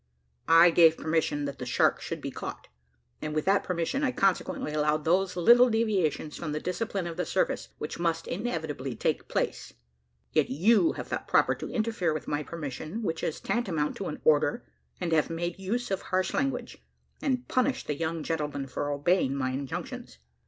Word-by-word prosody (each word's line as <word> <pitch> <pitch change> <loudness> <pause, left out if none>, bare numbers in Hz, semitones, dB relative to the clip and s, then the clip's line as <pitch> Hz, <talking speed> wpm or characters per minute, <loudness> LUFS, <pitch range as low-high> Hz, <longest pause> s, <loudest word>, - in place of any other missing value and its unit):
I 165 +1 +7
gave 165 -1 +6
permission 155 -2 0
that 140 -1 -5
the 125 - -4
shark 125 - +2
should - - -5
be - - -4
caught, - - -7 0.5
and 155 0 -4
with 155 - 0
that 195 +1 +3
permission, 180 - -1
I 260 - +2
consequently 190 -7 0
allowed 150 0 +1
those 180 +2 +2
little 240 +8 +6
deviations 200 -10 0
from 155 -3 -4
the 150 - -1
discipline 195 +2 -2
of 170 -1 -5
the 180 - 0
service, 190 - 0
which 150 - -5
must 165 -1 0
inevitably 160 - -3
take - - -1
place. - - -2 0.6
Yet 155 -2 +3
you 220 - +4
have - - -7
thought - - -3
proper - - +4
to - - -7
interfere 215 -8 0
with 155 - -5
my 145 0 -1
permission, 155 - -5
which 165 -4 -2
is 155 - -2
tantamount 170 -11 -1
to 195 - -4
an 150 - -5
order, 150 +7 +3 0.3
and 175 -2 -2
have 155 -2 +3
made 175 +2 -3
use 225 +5 -2
of 195 - 0
harsh 185 0 -1
language, 275 -1 -2 0.4
and 255 -3 -1
punished 260 +1 +1
the 150 - -1
young 160 +1 -3
gentlemen 150 -4 -2
for 135 +2 -3
obeying 145 0 +1
my 130 -2 -1
injunctions. 130 - -5
165 Hz, 180 wpm, -28 LUFS, 150-195 Hz, 0.6 s, I